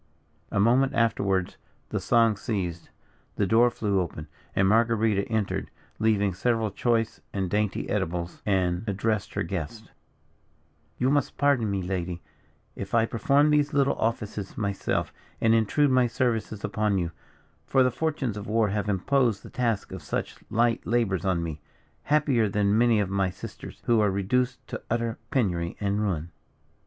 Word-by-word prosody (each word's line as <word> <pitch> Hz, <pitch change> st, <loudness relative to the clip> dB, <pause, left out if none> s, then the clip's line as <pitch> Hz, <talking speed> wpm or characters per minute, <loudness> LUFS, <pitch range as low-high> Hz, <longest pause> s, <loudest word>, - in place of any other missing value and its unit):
A -, -, -1 dB
moment 130 Hz, +6 st, +3 dB
afterwards 100 Hz, -6 st, +1 dB, 0.3 s
the -, -, -1 dB
song 115 Hz, -2 st, +3 dB
ceased, 90 Hz, -6 st, -3 dB, 0.5 s
the 100 Hz, -, +1 dB
door 115 Hz, +5 st, +5 dB
flew 105 Hz, -4 st, 0 dB
open, 75 Hz, -3 st, -5 dB, 0.3 s
and 95 Hz, -, +3 dB
Marguerita 110 Hz, -2 st, +2 dB
entered, 110 Hz, -3 st, -1 dB, 0.3 s
leaving 105 Hz, -3 st, +2 dB
several 115 Hz, +1 st, 0 dB
choice 115 Hz, +1 st, 0 dB
and 95 Hz, -3 st, -2 dB
dainty 105 Hz, -1 st, 0 dB
eatables, 85 Hz, +1 st, -3 dB
and 95 Hz, -2 st, +1 dB
addressed 105 Hz, +1 st, -1 dB
her -, -, 0 dB
guest: 100 Hz, +4 st, -5 dB, 1.1 s
"You 130 Hz, +2 st, +2 dB
must 145 Hz, 0 st, 0 dB
pardon 140 Hz, -6 st, +2 dB
me, 100 Hz, -2 st, -1 dB
lady, 90 Hz, -1 st, -3 dB, 0.6 s
if 100 Hz, +3 st, -4 dB
I 115 Hz, -1 st, +4 dB
perform 140 Hz, +7 st, +3 dB
these 150 Hz, 0 st, +2 dB
little 140 Hz, -1 st, +3 dB
offices 105 Hz, -3 st, -3 dB
myself, 100 Hz, -3 st, -1 dB, 0.3 s
and 115 Hz, 0 st, +4 dB
intrude 125 Hz, +6 st, +3 dB
my 130 Hz, -1 st, +4 dB
services 115 Hz, -4 st, -1 dB
upon 105 Hz, -1 st, 0 dB
you, 85 Hz, -2 st, -1 dB, 0.6 s
for 135 Hz, -1 st, +4 dB
the 125 Hz, -, +2 dB
fortunes 135 Hz, -5 st, -2 dB
of 105 Hz, -, -6 dB
war 110 Hz, -1 st, +2 dB
have 105 Hz, 0 st, -1 dB
imposed 110 Hz, +2 st, +1 dB
the -, -, -11 dB
task 115 Hz, -5 st, -1 dB
of 95 Hz, -2 st, -6 dB
such 70 Hz, -, -4 dB
light 115 Hz, +1 st, +2 dB
labours 105 Hz, -7 st, 0 dB
on 90 Hz, -3 st, +1 dB
me, 80 Hz, -2 st, -5 dB, 0.4 s
happier 140 Hz, -7 st, +2 dB
than 100 Hz, 0 st, +2 dB
many 115 Hz, -1 st, +4 dB
of 100 Hz, -2 st, -1 dB
my 95 Hz, -1 st, +1 dB
sisters, -, -, -10 dB
who 115 Hz, -2 st, +4 dB
are 105 Hz, -1 st, +3 dB
reduced 125 Hz, +7 st, 0 dB
to -, -, -5 dB
utter 115 Hz, 0 st, -1 dB
penury 90 Hz, -9 st, 0 dB
and 100 Hz, 0 st, 0 dB
ruin." 85 Hz, -5 st, -2 dB
105 Hz, 155 wpm, -26 LUFS, 95-120 Hz, 1.1 s, door